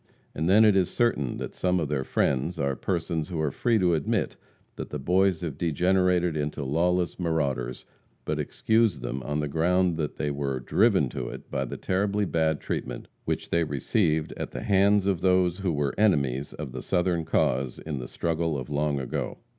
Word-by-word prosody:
And 80 +3 -1
then 110 +3 +7
it 105 -2 +5
is 95 -2 +3
certain 115 - 0
that - - -5
some 90 0 +1
of 80 - -1
their 70 -2 -1
"friends" 70 +7 0
are 70 -3 0
persons 80 +2 -2
who 85 -3 -4
are 75 -2 0
free 115 - +1
to 90 -4 +3
admit 75 -3 0 0.4
that - - -6
the 75 - -4
Boys 90 +4 +2
have 80 -5 -5
degenerated 90 +1 +2
into 75 -1 -2
lawless 90 +6 +1
marauders, 70 -8 -1 0.4
but - - -1
excuse 110 - +1
them 65 +2 -4
on 75 +4 -2
the 75 - -1
ground 85 +3 +2
that 75 -3 -2
they 75 - -2
were 70 -2 -2
driven 65 - +3
to - - -4
it - - -10
by 70 -1 -1
the - - -6
terribly 100 +2 0
bad 80 -3 +1
treatment - - -5 0.2
which - - -3
they 85 0 +3
received 80 - 0
at - - -4
the - - -6
hands 100 0 +3
of 95 -4 0
those 90 -1 +2
who 95 -3 0
were 70 -2 -1
enemies 70 - +2
of 75 -4 -6
the 65 0 -6
Southern 90 0 0
cause 65 -4 0
in 75 -4 -5
the 60 - -6
struggle 80 -2 -1
of 65 +1 -6
long 75 -1 0
ago. 65 - -3
80 Hz, 195 wpm, -27 LUFS, 70-90 Hz, 0.4 s, then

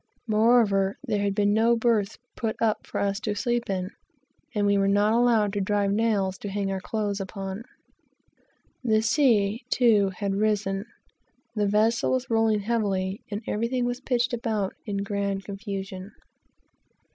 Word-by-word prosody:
Moreover, 215 -3 +3
there 215 -6 -1
had 200 -1 0
been 205 0 +2
no 230 +2 +4
berths 220 -3 +1 0.2
built 225 -2 -3 0.3
for - - -5
us 200 0 0
to 215 -1 -3
sleep 240 0 -1
in, 185 0 -2 0.6
and 205 -1 +1
we 200 0 +3
were 195 0 +2
not 205 +2 +3
allowed 230 -4 +3
to 205 - -1
drive 200 0 +1
nails 200 -3 0
to 205 - -5
hang 195 0 -2
our 190 - -2
clothes 205 -1 -2
upon. 195 +1 -5 1.2
The 220 -3 +2
sea, 225 -4 +2
too, 220 -6 +4
had 200 -2 -1
risen, 200 -1 0 0.7
the 210 -1 +1
vessel 220 +5 +2
was 255 -1 -2
rolling 225 -2 +2
heavily, 200 -3 -1
and 210 +2 -4
everything 235 +3 -1
was 245 +1 -3
pitched 245 -2 0
about 220 -4 -1
in 200 -1 -2
grand 200 -1 -2
confusion. 195 -1 -6
210 Hz, 150 wpm, -26 LUFS, 200-230 Hz, 1.2 s, no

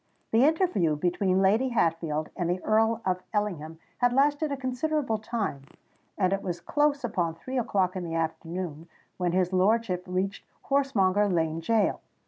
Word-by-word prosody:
The 230 +4 +5
interview 315 - +2
between 185 +4 +1
Lady 220 +7 +3
Hatfield 165 -8 0
and 175 -2 -1
the 180 +1 0
Earl 225 +1 +2
of 185 -1 0
Ellingham 170 -7 -2 0.2
had 245 -1 +3
lasted 290 +3 +2
a 280 - -2
considerable 260 -2 -1
time; 215 - -3 0.6
and 185 -1 +2
it 195 - -1
was 175 -2 -4
close 290 - +1
upon 175 -8 -1
three 255 +10 -3
o'clock 195 -6 0
in 185 - -3
the 165 -1 -4
afternoon 165 0 -4 0.3
when 180 -1 0
his 185 0 +1
lordship 190 -1 +2
reached 190 +2 -2 0.2
Horsemonger 210 -8 +2
Lane 165 -3 0
Gaol. 220 +5 +1
195 Hz, 155 wpm, -27 LUFS, 175-240 Hz, 0.6 s, The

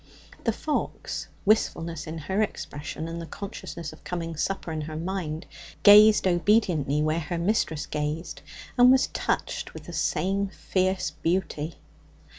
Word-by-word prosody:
The 230 - +3
fox, 295 +7 -3 0.2
wistfulness 170 -6 +1
in 160 +1 -5
her 190 +7 -1
expression 155 -6 -4
and 165 0 -5
the 165 - -7
consciousness 170 -5 -7
of 155 - -16
coming 165 -2 -4
supper 175 +2 -2
in 155 -1 -2
her 155 +1 -6
mind, 170 -2 -3 0.4
gazed 210 +1 +8
obediently 175 -6 +2
where 155 +2 +1
her 170 +2 -3
mistress 170 -4 0
gazed, 150 0 -3 0.4
and 250 +1 +9
was 260 0 +4
touched - - -2
with - - -8
the - - -9
same 195 +2 0
fierce 190 0 -1
beauty. 165 -3 -2
170 Hz, 140 wpm, -26 LUFS, 155-195 Hz, 0.4 s, and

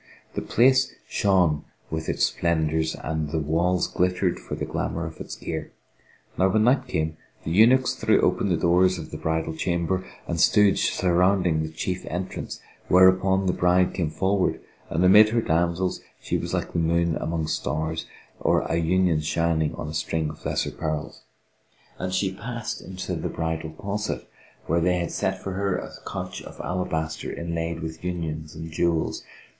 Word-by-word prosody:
The - - -2
place 130 +2 +3
shone 90 -7 +2 0.3
with 80 0 -3
its - - +2
splendours 80 -1 0
and 80 -1 -3
the 80 - -1
walls 85 +4 +1
glittered 90 0 0
for - - -6
the - - -3
glamour - - -2
of - - -8
its - - -6
gear. - - -5 0.7
Now 95 +1 +4
when 110 +3 +3
night 130 +2 +3
came, 80 -7 -2 0.3
the 80 - -3
eunuchs 120 +8 +5
threw - - +2
open 100 - +2
the 90 - +2
doors 90 +2 +3
of 80 - -8
the - - -5
bridal 80 0 -1
chamber 85 +2 0 0.2
and 85 -2 -1
stood 105 -2 +5
surrounding 90 -2 +2
the 80 - -3
chief 90 +3 -3
entrance 90 +3 -4 0.3
whereupon 95 +1 +5
the 90 - +2
bride 90 +1 +3
came 85 -5 -1
forward 95 +4 +1 0.3
and 85 +3 +1
amid 105 +3 +8
her 115 +1 +2
damsels 85 +3 0 0.2
she - - -3
was - - -2
like - - -2
the - - +1
moon 85 0 +2
among 80 -1 -2
stars 80 +2 -2 0.3
or - - +3
an 85 0 +1
union 90 -1 +3
shining 80 0 0
on - - -5
a 75 - -5
string 80 -1 -1
of 75 - -14
lesser - - -1
pearls, 75 -2 -4 0.8
and 90 0 -2
she 95 +1 0
passed 115 +2 -5
into 95 0 -5
the - - -2
bridal 80 -1 -3
closet 105 +5 -4 0.4
where 85 - +1
they 90 +1 +2
had 85 -1 -2
set 95 0 -2
for 95 - -3
her 95 0 0
a - - -6 0.2
couch - - -5
of - - -11
alabaster 80 -3 -2
inlaid 85 0 -3
with 80 +1 -6
unions 80 -3 -4
and 80 +1 -7
jewels. 85 0 0
85 Hz, 170 wpm, -25 LUFS, 80-95 Hz, 0.8 s, amid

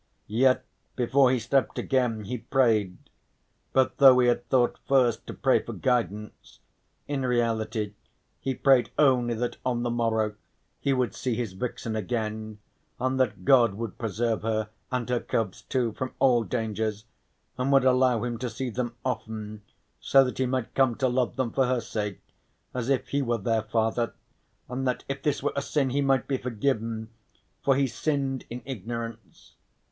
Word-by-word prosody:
Yet 130 +5 +2 0.3
before 130 +2 +4
he 130 - +2
slept 125 +3 0
again 125 -5 0
he 120 +4 -4
prayed, 115 -7 +2 0.7
but 130 -1 +2
though 135 -2 +9
he 125 -1 +5
had 120 0 -1
thought 125 -2 +2
first 125 -4 +2
to - - -5
pray - - +3
for - - -7
guidance, 105 -5 -2 0.5
in 145 -2 -2
reality 115 -4 0 0.5
he 135 -1 -2
prayed 135 -2 +4
only 125 -5 +3
that 120 +2 -3
on 120 -2 0
the 120 - -1
morrow 110 -2 0 0.5
he 140 - 0
would 130 -2 +1
see 125 -3 -2
his 115 -5 -3
vixen 115 +1 -4
again 110 0 -3 0.4
and 130 +1 0
that 105 -8 0
God 120 -7 +5
would 115 -1 -6
preserve 115 +1 -1
her, 110 -1 -1 0.2
and 125 -2 -1
her 125 -1 +1
cubs 110 -5 -2
too, 125 -4 -1
from 130 +4 -5
all 125 -3 +4
dangers, 110 -2 -2 0.5
and 130 +2 +1
would 135 -1 +5
allow 125 -3 +3
him 120 -2 -3
to 125 0 -2
see 130 +1 -4
them 120 0 -3
often, 110 -3 -4 0.4
so 135 0 +5
that 125 0 -4
he 130 - +2
might 130 -2 -2
come 130 -3 +3
to 130 - +1
love 125 0 0
them 130 -4 -1
for 135 -2 +2
her 130 -1 +1
sake 105 -4 -4 0.5
as 125 0 -3
if 135 -2 0
he 140 - 0
were 120 -3 0
their 115 +1 0
father, 110 +2 -1 0.5
and 130 +1 -3
that 125 - -1
if 135 0 -4
this 150 -3 -1
were - - 0
a 140 - 0
sin 140 -2 0
he 140 +2 +1
might 135 -2 +2
be 135 - 0
forgiven, 115 -2 -2 0.5
for 135 - +4
he 140 +1 +3
sinned 135 +1 -2
in 120 +1 -7
ignorance. 115 -3 -7
120 Hz, 175 wpm, -27 LUFS, 110-130 Hz, 0.7 s, though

